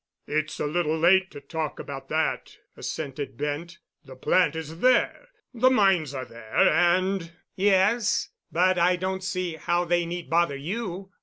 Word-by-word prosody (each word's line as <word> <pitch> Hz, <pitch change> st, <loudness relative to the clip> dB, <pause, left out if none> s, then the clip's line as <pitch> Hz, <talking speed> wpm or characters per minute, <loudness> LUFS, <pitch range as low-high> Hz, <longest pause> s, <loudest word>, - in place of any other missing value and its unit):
"It's 155 Hz, +1 st, -2 dB
a -, -, -1 dB
little 160 Hz, +1 st, 0 dB
late 190 Hz, +3 st, +4 dB
to -, -, -10 dB
talk 155 Hz, +2 st, -4 dB
about 135 Hz, -1 st, -8 dB
that," 160 Hz, +1 st, -1 dB, 0.2 s
assented 140 Hz, -4 st, -5 dB
Bent. 150 Hz, +4 st, -4 dB, 0.3 s
"The 130 Hz, -, -12 dB
plant 160 Hz, +4 st, +2 dB
is 160 Hz, 0 st, -6 dB
there, 255 Hz, -, +2 dB, 0.3 s
the 250 Hz, +2 st, +4 dB
mines 190 Hz, -, +2 dB
are 130 Hz, -1 st, -4 dB
there, 115 Hz, -1 st, -9 dB
and——" 180 Hz, +1 st, +2 dB, 0.3 s
"Yes. 205 Hz, +3 st, +2 dB, 0.2 s
But 180 Hz, +1 st, +3 dB
I 180 Hz, +1 st, +4 dB
don't 190 Hz, +1 st, -3 dB
see 185 Hz, -3 st, -3 dB
how 175 Hz, +2 st, 0 dB
they 175 Hz, 0 st, +1 dB
need 175 Hz, 0 st, -5 dB
bother 165 Hz, -4 st, +1 dB
you. 190 Hz, +4 st, -5 dB
175 Hz, 155 wpm, -26 LUFS, 155-190 Hz, 0.3 s, late